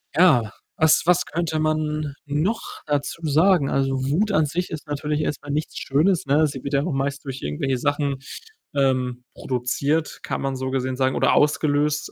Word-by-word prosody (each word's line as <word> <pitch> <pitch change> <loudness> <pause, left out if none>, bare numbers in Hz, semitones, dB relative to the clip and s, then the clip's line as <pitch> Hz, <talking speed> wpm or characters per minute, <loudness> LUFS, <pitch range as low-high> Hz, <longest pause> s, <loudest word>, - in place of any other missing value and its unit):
ja, 125 - +5 0.2
was 160 -1 +4
was 180 0 +3
könnte 160 -1 -2
man 155 -2 -1
noch 155 +10 -2
dazu 145 +3 -2
sagen? 155 0 +3
Also, 135 0 +1 0.2
Wut 205 +7 +1
an 155 -3 +4
sich 175 +5 -2
ist 155 -1 -7
natürlich 150 +1 -2
erst 150 - -2
mal 145 - -6
nichts 150 +1 -3
Schönes, 160 +6 +1
ne? 145 +3 +3
Sie 135 -3 -7
wird 140 - -4
ja 140 +1 +2
auch 165 - -2
meist 135 +1 -2
durch 135 -1 -6
irgendwelche 125 - -1
Sachen, 145 0 0 0.6
ähm, 130 -2 +1
produziert, 140 +5 -1
kann - - -3
man 135 -1 -2
so 130 0 -3
gesehen 130 -1 -1
sagen, 130 0 +1
oder - - +3
ausgelöst, 150 0 +1
145 Hz, 180 wpm, -23 LUFS, 135-155 Hz, 0.6 s, ja